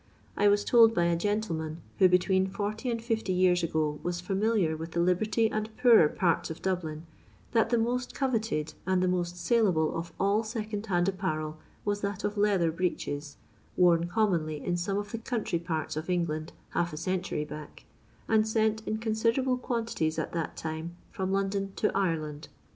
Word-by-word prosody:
I 205 - +3
was 205 0 +4
told 230 -2 +6
by 175 - +3
a 170 0 +2
gentleman, 170 -5 -2 0.2
who 185 -2 +7
between 185 +1 +3
40 210 +5 -3
and 230 -1 -1
50 225 -4 -1
years 180 -1 +3
ago 155 -2 -1
was 175 0 -2
fiuniliar 195 -2 +1
with 160 +1 -7
the 170 - 0
liberty 210 +6 +2
and 215 0 -2
poorer 225 -11 +6
parts 170 0 0
of 160 - -6
Dablin, 165 -5 -2 0.5
that 225 -1 +3
the 240 - +3
most 245 +2 -1
coveted 225 - -1
and 185 -1 +2
the - - +2
most 175 -1 -1
saleable 180 -6 +2
of 165 +1 -4
all 200 +3 +2
second 215 -1 -4
hand 175 -2 +2
apparel 155 -5 -2 0.3
was 205 0 -1
that 200 -1 -3
of 205 0 -1
leather 200 -5 +2
breeches, 150 -4 -3 0.4
worn 170 -2 +4
commonly 175 -7 0
in 175 - 0
some 185 +3 -1
of 205 0 -4
the 230 - -4
country 225 -7 -2
parts 160 -3 -3
of 155 +1 -4
Bngland 165 -3 -1 0.2
half 175 0 0
a - - -5
century 180 -2 -2
back, 150 0 -10 0.4
and 220 -1 +3
sent 220 0 +1
in 215 - 0
considerable 230 +4 +1
quantities 225 -11 -1
at - - -2
that 165 -2 -3
time 160 +2 -5 0.2
from 190 -4 -2
London 195 0 -1
to - - +1
Irehuid. 160 -5 -2
185 Hz, 175 wpm, -29 LUFS, 165-215 Hz, 0.5 s, who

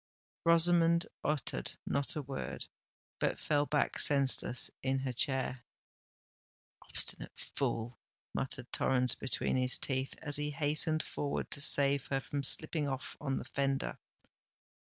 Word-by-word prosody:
Rosamond 170 0 +4 0.2
uttered 140 - -2
not 140 0 -2
a 150 - -3
word, 135 0 -6 0.5
but - - 0
fell 145 -1 0
back 150 - 0
senseless 135 -3 +4
in 135 0 0
her 130 -1 -3
chair. 130 0 0 1.2
"Obstinate - - -1
fool!" 120 -3 -4 0.3
muttered - - -4
Torrens 125 -1 +2
between 130 0 -1
his 130 0 +3
teeth, 130 0 -2
as 145 -2 -1
he 150 0 -2
hastened 155 +2 +2
forward 145 -1 -4
to 140 - -1
save 140 -1 +4
her 135 - -1
from 140 +2 -4
slipping 155 +2 +4
off 135 -1 -5
on 135 -2 -2
the - - -6
fender. 135 -1 -2
140 Hz, 130 wpm, -32 LUFS, 130-150 Hz, 1.2 s, Rosamond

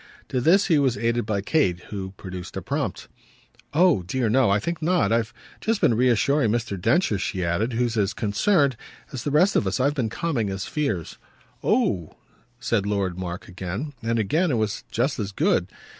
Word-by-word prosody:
To 130 - 0
this 180 +9 +4
he 160 -5 +3
was 130 -3 +1
aided 115 -1 0
by 100 -3 0
Kate, 100 - +1
who 95 -2 -5
produced 90 -2 -7
a - - -3
prompt: - - -3 0.6
"Oh 170 - +4
dear 115 +6 -1
no; 130 0 +4
I 100 - +4
think 170 +10 -3
not. 170 - +2
I've 115 -1 +1 0.3
just 225 -1 0
been 120 - +4
reassuring 125 +2 +3
Mr. 115 -3 -1
Densher," 125 - +2
she 95 -2 -2
added 105 +9 0
"who's 120 0 0
as 100 -1 +1
concerned 135 - +2 0.4
as 125 -3 -4
the - - -1
rest 175 +8 +3
of 100 - +2
us. 95 - -1
I've 140 +3 +2
been 125 -6 -1
calming 135 - -1
his 95 -1 -3
fears." 115 - -3 0.4
"Oh!" 85 -6 +1 0.4
said 115 -4 0
Lord 95 -3 -1
Mark 90 0 -5
again 95 - -5
and 115 0 0
again 155 - +1
it 135 - +1
was 110 -2 -2
just 130 +4 0
as 100 -2 -3
good. - - +1
115 Hz, 190 wpm, -24 LUFS, 100-140 Hz, 0.6 s, this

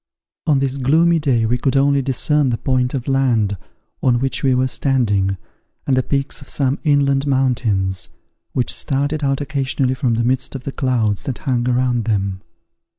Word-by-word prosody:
On 150 -3 +4
this 135 0 -1
gloomy 165 +6 +3
day 130 -7 +1
we 120 +2 0
could 135 +1 +1
only 140 0 +3
discern 140 +2 +2
the 115 - -1
point 130 0 0
of 130 0 -4
land 120 -7 +1 0.5
on 125 -2 +3
which 135 +1 -1
we 130 -2 +2
were 130 +1 +2
standing, 105 -9 0 0.5
and 135 - +2
the 130 - +3
peaks 140 +2 -2
of 135 - -11
some 135 0 0
inland 140 -1 +2
mountains, 115 -9 0 0.4
which 125 - +1
started 145 +2 -1
out 135 0 0
occasionally 135 -2 -1
from 125 -3 0
the 115 - 0
midst 130 +3 -1
of 130 - -6
the 140 - -4
clouds 115 -7 -1
that 130 - -3
hung 125 -2 -1
around 125 -2 +1
them. 100 -4 -1
130 Hz, 175 wpm, -19 LUFS, 120-140 Hz, 0.5 s, On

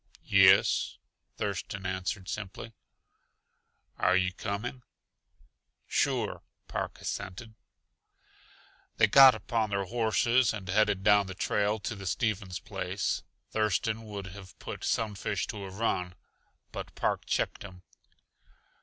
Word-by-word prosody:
"Yes," 95 -1 +5 0.4
Thurston 100 -1 -3
answered 95 +1 -3
simply. 105 +2 -6 1.3
"Are 90 - +4
you 90 -1 +2
coming?" 110 +6 -4 1.0
"Sure," - - 0 0.3
Park - - -4
assented. 100 +4 -5 1.4
They - - +6
got 135 +4 +8
upon 115 -3 -1
their 100 -1 -1
horses 115 +2 +2
and 100 -3 -8
headed 100 0 +2
down 105 -1 +5
the 95 - -7
trail 105 +2 +1
to 110 +2 -3
the 100 -1 -7
Stevens 100 -3 -1
place. - - -2 0.3
Thurston 110 +1 0
would 100 -2 -6
have 95 -2 -12
put - - -7
Sunfish 105 -2 -1
to 105 -2 -6
a - - -7
run, 95 -3 -1 0.6
but - - -7
Park - - -1
checked - - -1
him. 90 -2 -11
100 Hz, 115 wpm, -30 LUFS, 95-110 Hz, 1.4 s, got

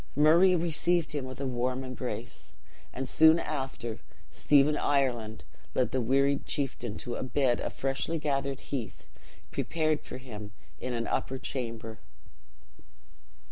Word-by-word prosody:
Murray 165 +6 +6
received 170 0 +1
him 145 -3 -3
with 130 0 -8
a 140 - -2
warm 130 +1 -1
embrace; 125 -3 -6 0.4
and, 130 +1 -4
soon 160 +4 +6
after, 135 -8 -4 0.3
Stephen 145 +1 +4
Ireland 125 -7 0 0.3
led 130 - +2
the 130 - +1
wearied 140 +4 +2
chieftain 120 -6 -2
to 120 - -5
a - - -3
bed 130 -1 +1
of - - -2
freshly 135 +4 -1
gathered 140 -3 -1
heath, 120 -7 -6 0.4
prepared 155 -2 0
for - - -7
him 105 -5 -9 0.3
in 125 - -3
an 115 0 -1
upper 130 - -1
chamber. 115 -4 -4
135 Hz, 135 wpm, -30 LUFS, 120-150 Hz, 0.4 s, Murray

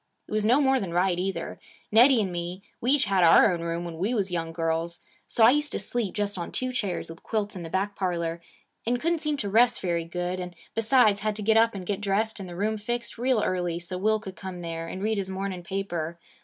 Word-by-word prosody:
It - - -16
was 215 0 +1
no 240 +6 +4
more 265 -1 +3
than 175 -5 -4
right, 180 0 +2
either. 190 +1 -3 0.3
Nettie 235 +1 +6
and 190 - -3
me, 175 +2 -5 0.2
we 245 - 0
each 285 -3 +4
had 195 -3 +2
our 170 +3 +7
own 170 - -3
room 170 +1 -3
when 165 -1 -7
we 210 +7 0
was 195 -4 0
young 165 -2 -2
girls. 165 +1 -2 0.3
So 230 - +2
I 225 - +9
used 295 +2 +1
to - - -1
sleep 235 -6 -2
just 205 -2 -1
on 170 - -5
two 255 0 -2
chairs 200 -8 -2
with 165 - -12
quilts 210 -2 -2
in 180 - -6
the 165 - -6
back 200 +3 -1
parlor, 170 -3 -2 0.4
and 245 +2 0
couldn't 335 +4 0
seem 300 -2 -1
to 215 - -3
rest 235 +3 +4
very 170 -3 -1
good, 180 +2 -3
and, 180 -1 -6 0.2
besides, 225 -2 +4
had 215 0 -1
to 210 - -5
get 220 +2 +3
up 230 -1 +4
and 185 -2 -6
get 205 +1 -2
dressed 210 +2 0
and 190 -2 -7
the 175 - -8
room 215 +3 -1
fixed, 240 +2 -4
real 245 -3 +2
early, 175 -2 -1
so 175 +2 -3
Will 215 +2 +2
could 190 -3 -9
come 185 -2 -7
there 165 -1 -5
and 185 +3 -6
read 215 -1 +1
his 190 -1 -3
morning 190 -1 -4
paper. 170 -3 -3
195 Hz, 250 wpm, -26 LUFS, 175-220 Hz, 0.4 s, I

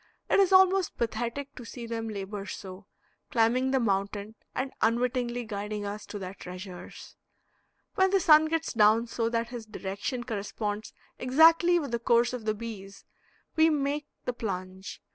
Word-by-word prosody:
It - - +5
is 390 -2 +4
almost 380 -1 +5
pathetic 240 +4 -3
to 250 - -10
see 235 +1 -8
them 225 -1 -4
labor 200 -1 -5
so, 190 0 -8 0.4
climbing 245 +3 +2
the 265 0 +2
mountain 200 -1 -1 0.2
and 265 +1 -2
unwittingly 240 +1 0
guiding 210 0 -4
us 205 +1 -6
to 210 - -6
their 190 -1 -6
treasures. 180 -1 -10 0.8
When 380 -1 +3
the 390 0 +3
sun 310 -2 +7
gets 325 0 -1
down 220 +1 +5
so 230 -1 -1
that 230 0 -1
his 240 -3 -7
direction 205 +5 -4
corresponds 210 -1 -4 0.3
exactly 325 +6 +5
with 285 -7 -3
the 235 - 0
course 235 +1 +3
of 240 -3 -5
the 215 -1 0
bees, 205 -3 -8 0.5
we 320 0 +5
make 290 0 -1 0.2
the 250 - -1
plunge. 190 -4 -5
230 Hz, 160 wpm, -28 LUFS, 205-265 Hz, 0.8 s, sun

